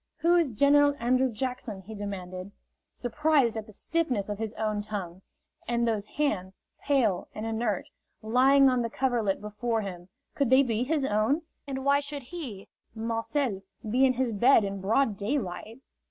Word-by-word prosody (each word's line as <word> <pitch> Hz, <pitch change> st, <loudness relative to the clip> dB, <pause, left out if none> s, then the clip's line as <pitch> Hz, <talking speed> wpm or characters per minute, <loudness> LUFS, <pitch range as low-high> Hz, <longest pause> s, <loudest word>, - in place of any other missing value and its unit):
"Who 340 Hz, +1 st, +3 dB
is 335 Hz, -5 st, +3 dB
General 285 Hz, +5 st, +4 dB
Andrew 255 Hz, +2 st, +2 dB
Jackson?" 230 Hz, -4 st, -4 dB
he 220 Hz, +4 st, -9 dB
demanded, 190 Hz, -2 st, -6 dB, 0.4 s
surprised 275 Hz, -1 st, +1 dB
at 220 Hz, -1 st, -5 dB
the -, -, -12 dB
stiffness 250 Hz, -5 st, -1 dB
of 205 Hz, 0 st, -4 dB
his 220 Hz, -2 st, -2 dB
own 215 Hz, -1 st, -1 dB
tongue. 195 Hz, -4 st, -6 dB, 0.5 s
And 235 Hz, 0 st, +1 dB
those 215 Hz, -2 st, -1 dB
hands, 195 Hz, -11 st, -2 dB, 0.3 s
pale 240 Hz, -10 st, +1 dB
and 215 Hz, -, -4 dB
inert, 225 Hz, +1 st, -1 dB, 0.4 s
lying 265 Hz, +5 st, +5 dB
on 255 Hz, -2 st, +3 dB
the 230 Hz, -, -2 dB
coverlet 235 Hz, -6 st, 0 dB
before 220 Hz, +2 st, -2 dB
him, 180 Hz, -3 st, -7 dB, 0.2 s
could 280 Hz, -4 st, 0 dB
they 260 Hz, +2 st, +6 dB
be 230 Hz, -3 st, -1 dB
his 290 Hz, +1 st, 0 dB
own? 225 Hz, +8 st, +1 dB, 0.2 s
And 265 Hz, -1 st, -4 dB
why 280 Hz, 0 st, +4 dB
should 285 Hz, -1 st, -6 dB
he, 250 Hz, -, -7 dB, 0.3 s
Marcel, 230 Hz, 0 st, -1 dB, 0.3 s
be 250 Hz, +5 st, +2 dB
in 260 Hz, -1 st, +5 dB
his 255 Hz, -1 st, 0 dB
bed 230 Hz, +3 st, +5 dB
in 195 Hz, -1 st, -4 dB
broad 220 Hz, +2 st, +2 dB
daylight? 220 Hz, 0 st, -3 dB
230 Hz, 165 wpm, -28 LUFS, 205-270 Hz, 0.5 s, they